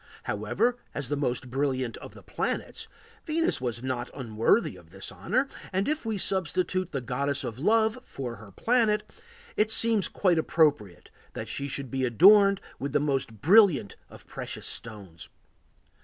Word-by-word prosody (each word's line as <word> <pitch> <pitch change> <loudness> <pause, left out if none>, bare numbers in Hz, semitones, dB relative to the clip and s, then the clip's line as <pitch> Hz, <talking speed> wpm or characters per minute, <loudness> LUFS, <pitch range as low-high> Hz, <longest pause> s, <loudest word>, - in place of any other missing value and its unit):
However, 245 0 0 0.2
as 140 -4 -3
the 145 - 0
most 130 -3 -2
brilliant 130 -3 -1
of - - -11
the - - -13
planets, - - -3 0.4
Venus 325 - +1
was 120 -1 -3
not 130 -2 -3
unworthy 115 - +1
of 85 -3 -16
the 95 +3 -7
honor, 255 +9 0 0.2
and 190 +1 0
if 305 -4 -1
we 220 -2 -1
substitute 185 -1 0
the 135 - -3
Goddess 140 +3 -1
of 115 +1 -6
Love 220 - +2
for 130 - -7
her 105 -1 -13
planet, 220 - +2 0.5
it 215 0 +2
seems 220 -2 +3
quite 180 -4 +1
appropriate 145 - +1 0.2
that - - -6
she 140 - -3
should 135 -2 -5
be 130 -1 -1
adorned 195 - +6 0.2
with 140 0 -4
the - - +3
most 135 -7 -2
brilliant 180 - +5
of - - -14
precious - - -7
stones. 95 -7 -5
145 Hz, 155 wpm, -27 LUFS, 120-205 Hz, 0.5 s, adorned